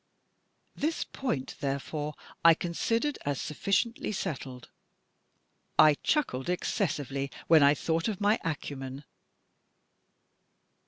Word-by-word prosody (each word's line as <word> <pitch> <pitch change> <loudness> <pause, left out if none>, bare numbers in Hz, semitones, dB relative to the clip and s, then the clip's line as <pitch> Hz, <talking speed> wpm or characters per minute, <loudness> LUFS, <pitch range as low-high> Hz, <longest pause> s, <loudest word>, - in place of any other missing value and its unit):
This 315 +2 -1
point, 155 - -3
therefore, 145 +2 -3 0.3
I 165 -1 +8
con 170 +1 -4
sidered 230 - 0
as 145 -2 -1
sufficiently 200 +9 0
settled. 130 - -5 1.1
I 155 -1 +8
chuckled 145 - 0
excessively 145 - -1 0.2
when 160 -2 +6
I 140 +1 +6
thought 165 +5 0
of 210 -4 -2
my 205 +2 +3
acumen. 140 -3 -4
155 Hz, 100 wpm, -29 LUFS, 140-200 Hz, 1.1 s, I